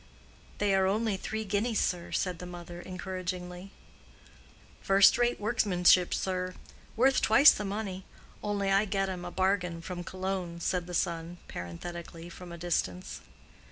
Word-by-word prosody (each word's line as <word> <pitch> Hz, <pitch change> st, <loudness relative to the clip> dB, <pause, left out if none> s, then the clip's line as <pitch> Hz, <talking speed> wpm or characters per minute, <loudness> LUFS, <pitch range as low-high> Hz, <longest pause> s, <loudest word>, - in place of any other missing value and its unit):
"They 205 Hz, -1 st, +2 dB
are 190 Hz, 0 st, +3 dB
only 215 Hz, +1 st, +1 dB
three 220 Hz, +3 st, -4 dB
guineas, 210 Hz, +3 st, 0 dB
sir," 175 Hz, -1 st, -1 dB
said 180 Hz, -3 st, -1 dB
the 180 Hz, -, -7 dB
mother, 175 Hz, 0 st, -8 dB
encouragingly. 185 Hz, 0 st, -5 dB, 1.1 s
"First 195 Hz, 0 st, +6 dB
rate 240 Hz, 0 st, +1 dB
workmanship, 185 Hz, -5 st, +3 dB
sir—worth 190 Hz, +7 st, -1 dB
twice 270 Hz, +8 st, +8 dB
the 210 Hz, -, -3 dB
money; 195 Hz, -2 st, -4 dB, 0.4 s
only 200 Hz, -1 st, -1 dB
I 195 Hz, +2 st, +4 dB
get 195 Hz, -1 st, 0 dB
'em 180 Hz, -2 st, -5 dB
a -, -, -4 dB
bargain 185 Hz, -2 st, 0 dB
from 175 Hz, +1 st, -6 dB
Cologne," 185 Hz, -2 st, -4 dB
said 180 Hz, 0 st, -1 dB
the 180 Hz, -, -4 dB
son, 170 Hz, 0 st, -2 dB
parenthetically, 165 Hz, -, -7 dB
from 175 Hz, 0 st, -10 dB
a 170 Hz, -, -7 dB
distance. 160 Hz, -, -2 dB
185 Hz, 140 wpm, -30 LUFS, 175-200 Hz, 1.1 s, twice